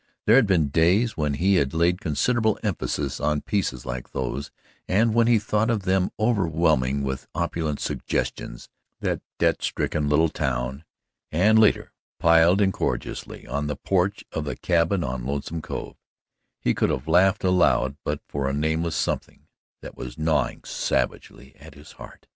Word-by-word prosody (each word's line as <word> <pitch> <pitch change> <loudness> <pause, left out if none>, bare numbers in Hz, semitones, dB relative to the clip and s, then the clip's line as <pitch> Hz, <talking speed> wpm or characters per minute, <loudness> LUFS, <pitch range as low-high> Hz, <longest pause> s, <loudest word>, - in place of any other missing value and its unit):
There 110 - +6
had 130 -5 +5
been 85 -7 +2
days 90 - +2
when 75 -2 -1
he 95 +5 +3
had 70 -1 0
laid 85 +2 +2
considerable 110 - +1
emphasis 80 - -2
on 75 -1 0
pieces 80 -12 -2
like 60 -1 -6
those, 65 +2 -3 0.4
and 110 +4 +2
when 115 0 +3
he 120 -1 +5
thought 105 +1 0
of 110 -4 0
them 95 0 +1
overwhelming 80 - +1
with 65 -1 -4
opulent 80 -3 -2
suggestions - - -3 0.3
that - - -1 0.2
debt - - +1
stricken 75 -1 -1
little 80 +2 +3
town, 65 +1 -3 0.5
and, 105 +7 +4
later, 105 -2 +3 0.3
piled 85 +4 +5
incongruously 95 -10 -2
on 70 +2 -3
the 75 - -2
porch 95 +5 -1
of 80 - -3
the 75 - -4
cabin 85 +1 +1
on 65 -2 -3
Lonesome 70 +5 -3
Cove, - - -6 0.6
he - - +1
could - - +1
have 65 - -3
laughed 95 +4 +3
aloud 90 -8 +3
but - - -3
for 70 -1 -2
a - - -2
nameless 80 +2 -1
something - - -3 0.4
that - - -10
was 65 0 -8
gnawing 80 0 0
savagely - - -3
at - - -13
his 75 +2 -14
heart. - - -13
80 Hz, 160 wpm, -24 LUFS, 70-95 Hz, 0.6 s, There